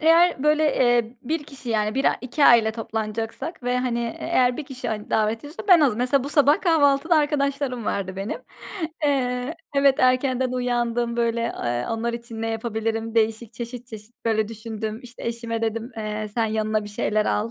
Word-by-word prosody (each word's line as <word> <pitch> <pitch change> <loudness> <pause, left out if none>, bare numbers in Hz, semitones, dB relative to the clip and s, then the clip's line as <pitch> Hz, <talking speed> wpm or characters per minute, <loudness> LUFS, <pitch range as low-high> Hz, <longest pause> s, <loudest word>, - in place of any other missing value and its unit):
eğer, 330 -2 +4
böyle, 300 +1 +3
eee, 240 -1 +2
1 305 +4 -2
kişi 275 -4 -11
yani 215 -1 0
1 270 +1 0
a - - +3
2 270 +4 0
aile 225 -3 +6
toplanacaksak 225 +6 -4
ve, 250 0 0
hani, 245 -2 -1
e 230 - -5
eğer 250 -7 +2
1 310 - -5
kişi, 265 -2 -6
hani, 210 -1 -4
davet 220 +1 +1
ediyorsa 290 +7 -9
ben 350 -3 +8
az 255 -8 +3
mesela 255 +2 +1
bu - - -3
sabah, 290 +4 +4
kahvaltıda 320 -2 +3
arkadaşlarım 280 -5 0
vardı 190 -2 -2
benim. 195 +3 -4 0.6
Eee, 255 0 0 0.2
evet, 275 -1 +5
erkenden 255 0 +2
uyandım, 240 -1 0
böyle, 235 0 +1 0.2
eee, 120 0 -1
onlar 230 +1 -1
için 235 -1 -6
ne 225 - -1
yapabilirim? 225 0 -2
Değişik, 225 0 +1
çeşit 235 +1 -7
çeşit, 220 0 -11
böyle, 220 -1 +1
düşündüm, 220 0 -5
işte, 240 -1 -12
eşime 230 -1 -3
dedim, 225 +2 -2
eee, 215 0 -3
sen 230 -2 +1
yanına 215 0 0
bir - - -7
şeyler 210 +1 0
al. 215 +2 0
235 Hz, 180 wpm, -24 LUFS, 220-265 Hz, 0.6 s, ben